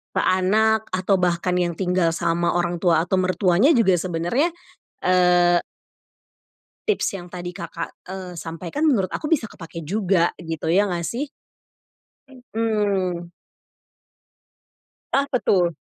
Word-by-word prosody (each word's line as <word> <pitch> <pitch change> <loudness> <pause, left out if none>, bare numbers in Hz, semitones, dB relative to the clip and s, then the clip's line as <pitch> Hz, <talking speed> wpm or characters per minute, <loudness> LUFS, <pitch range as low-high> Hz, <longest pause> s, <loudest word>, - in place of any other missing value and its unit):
ke - - +2
anak 220 +4 +3
atau 185 +1 +1
bahkan 180 0 +1
yang 175 -2 0
tinggal 180 -2 +2
sama 170 +1 0
orang 175 0 0
tua, 165 -2 +3
atau 190 - +1
mertuanya 185 - +3
juga 215 - +4
sebenarnya, 185 - 0 0.5
eee 180 -1 +4 1.3
tips 405 - 0
yang 175 -2 -9
tadi 175 -1 -6
Kakak, 170 0 -6 0.2
eee, 185 -2 -7
sampaikan 170 - -5
menurut 230 -12 +3
aku 300 - -5
bisa 260 -9 +2
kepakai 165 -4 -9
juga, 190 -3 +1
gitu 160 -2 -5
ya, 190 +5 +4
nggak 170 -1 -2
sih? 275 +4 -4 1.2
Mhm. 200 -6 0 1.8
Apa 275 -2 +2
tuh? 175 -8 +2
180 Hz, 120 wpm, -22 LUFS, 175-205 Hz, 1.8 s, juga